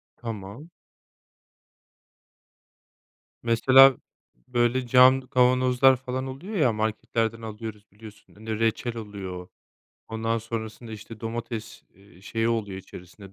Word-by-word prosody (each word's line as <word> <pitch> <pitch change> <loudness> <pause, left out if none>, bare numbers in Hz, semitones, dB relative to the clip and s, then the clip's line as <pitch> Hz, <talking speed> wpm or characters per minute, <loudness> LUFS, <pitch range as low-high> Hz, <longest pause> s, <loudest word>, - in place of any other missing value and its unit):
Tamam 115 - -8 2.7
Mesela 130 +3 +6 0.5
böyle 120 +1 +1
cam 130 +2 +6
kavanozlar 130 +1 +3
falan 130 +1 -5
oluyor 150 +12 -7
ya 130 - +3
marketlerden 110 +1 -2
alıyoruz, 110 -1 -8
biliyorsun 105 +1 -15
reçel 115 +2 -2
oluyor. 95 -4 -7 0.6
Ondan 115 +1 -1
sonrasında, 110 0 -6
işte, 110 +1 -10
domates, 115 -1 -6
eee, 95 -1 -20
şeyi 115 +3 -2
oluyor 105 -5 -2
içerisinde 95 +1 -13
115 Hz, 95 wpm, -25 LUFS, 105-125 Hz, 2.7 s, Mesela